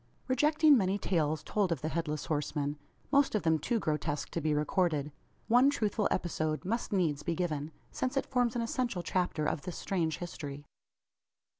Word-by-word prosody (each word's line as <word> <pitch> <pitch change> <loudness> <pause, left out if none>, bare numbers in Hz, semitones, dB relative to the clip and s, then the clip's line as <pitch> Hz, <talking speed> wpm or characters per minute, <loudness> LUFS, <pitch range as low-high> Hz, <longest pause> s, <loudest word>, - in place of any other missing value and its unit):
Rejecting 300 +3 +5
many 195 -4 +2
tales 155 -6 0
told 200 -4 0
of 160 -6 -1
the 155 - -1
Headless 155 -2 -2
Horseman 145 -1 -1 0.4
most 280 -4 +4
of 210 - 0
them 160 -1 +3
too 235 +10 0
grotesque 150 -5 -2
to 165 - -2
be 155 0 +1
recorded 150 -1 +1 0.4
one 245 +4 +6
truthful 215 -6 0
episode 155 -3 -1
must 230 +5 -2
needs 165 -7 +1
be 170 -2 -2
given 155 -4 -2 0.2
since 260 +1 -2
it - - +1
forms 245 -2 +1
an 235 - 0
essential 230 -6 -2
chapter 175 -3 0
of 150 - -1
this 180 +1 -6
strange 165 -5 -1
history. 145 -5 -7
175 Hz, 170 wpm, -31 LUFS, 155-230 Hz, 0.4 s, one